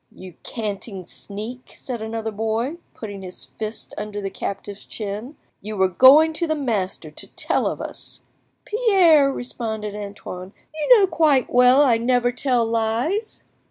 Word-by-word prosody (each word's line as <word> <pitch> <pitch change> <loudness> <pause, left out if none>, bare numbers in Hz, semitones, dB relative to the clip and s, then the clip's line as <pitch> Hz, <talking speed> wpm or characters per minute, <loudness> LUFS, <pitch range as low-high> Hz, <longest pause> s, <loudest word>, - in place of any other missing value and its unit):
"You 185 -1 -11
canting 205 -4 -5
sneak!" 220 +8 -8
said 245 -4 -6
another 220 0 -3
boy, 225 +8 -2 0.2
putting 205 -3 -7
his 185 -1 -3
fist 215 0 -6
under 210 0 -5
the 195 -1 -4
captive's 200 +1 -6
chin; 215 +6 -5 0.3
"you 210 +1 -6
were 190 0 +4
going 280 - +7
to 340 +2 -1
the 315 - 0
master 200 - -2
to - - -12
tell - - 0
of - - -3
us." - - -7 0.4
"Pierre," 370 - +4
responded 220 -5 -4
Antoine, 200 -2 -8 0.2
"you 315 +11 +5
know 400 - +5
quite 310 -8 +2
well 250 +3 +6
I 235 -5 +3
never 245 +1 +2
tell 245 -2 +1
lies." 230 - -1
230 Hz, 150 wpm, -22 LUFS, 205-275 Hz, 0.4 s, going